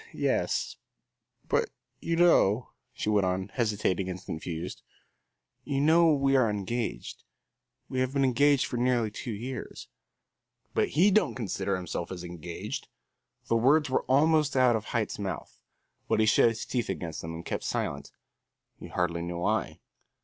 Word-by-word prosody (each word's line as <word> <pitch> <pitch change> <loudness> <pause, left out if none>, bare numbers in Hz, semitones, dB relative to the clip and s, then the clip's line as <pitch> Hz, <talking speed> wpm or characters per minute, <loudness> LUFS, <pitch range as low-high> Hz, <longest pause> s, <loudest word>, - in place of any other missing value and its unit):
"Yes, - - 0 0.7
but - - +1 0.3
you 165 - -1
know," 130 - +4 0.2
she - - -5
went 105 -3 +3
on, 95 +1 -2
hesitating 100 -5 0
and 90 0 -4
confused, 80 +2 -5 0.8
"you 140 -2 -1
know 160 +3 +5
we 135 -2 +2
are 125 -4 +4
engaged. 105 +3 -4 0.6
We 130 - -3
have 130 0 +1
been 140 0 +1
engaged 140 +2 +3
for 125 - -4
nearly 120 -3 +1
two 105 - -7
years." 120 +4 -6 0.8
"But - - +1
he 195 +5 +6
don't 215 +2 +2
consider 100 -4 -2
himself 90 -1 -4
as 90 -2 -6
engaged!" 85 -1 -6 0.6
The 115 - +1
words 135 +4 +3
were - - +2
almost 150 +1 +3
out 125 -2 +5
of 110 -1 -3
Haight's 110 -4 -2
mouth, 95 -2 -5 0.5
but - - +1
he 110 - +4
shut 110 +2 +5
his 115 -1 -5
teeth 120 -2 -2
against 80 -3 -4
them 80 0 -6
and 85 +1 -8
kept - - -3
silence - - -3 0.7
he - - -8
hardly 85 -1 -1
knew 85 0 -4
why. 85 - -1
115 Hz, 155 wpm, -28 LUFS, 95-135 Hz, 0.8 s, he